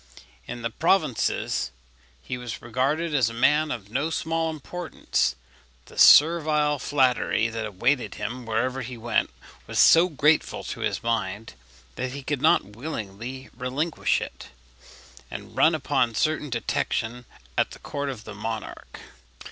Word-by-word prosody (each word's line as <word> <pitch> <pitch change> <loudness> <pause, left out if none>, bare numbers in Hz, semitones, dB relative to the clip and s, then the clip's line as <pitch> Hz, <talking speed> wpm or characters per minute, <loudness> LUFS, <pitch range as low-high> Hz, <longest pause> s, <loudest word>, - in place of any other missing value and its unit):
In 120 0 -6
the 115 - -2
provinces 130 - +1 0.5
he 125 - -4
was 125 -2 -6
regarded 140 +8 -1
as 130 -6 +3
a 115 - -8
man 150 +5 +3
of 105 -6 -6
no 140 +6 0
small 165 0 -1
importance; 160 - -2 0.5
the - - -16
servile 150 -2 +6
flattery 130 -5 +2
that 115 -1 -4
awaited 120 +7 0
him 125 0 -5
wherever 125 +4 -1
he 125 -1 -7
went 115 0 0 0.4
was - - -5
so 170 +2 +7
grateful 150 0 +2
to - - -6
his - - -2
mind 115 -2 -2 0.4
that 130 0 -3
he 140 0 -7
could 145 -1 -2
not 155 - +4
willingly 125 -1 -6
relinquish 135 +6 -1
it, - - -8 0.8
and - - -9
run 160 +1 +5
upon 135 -6 0
certain 155 +1 0
detection 120 0 -2 0.3
at - - +2
the - - -11
court 140 -1 -4
of 125 -5 -6
the 110 - -8
monarch. 110 +1 -6
130 Hz, 140 wpm, -25 LUFS, 115-150 Hz, 0.8 s, so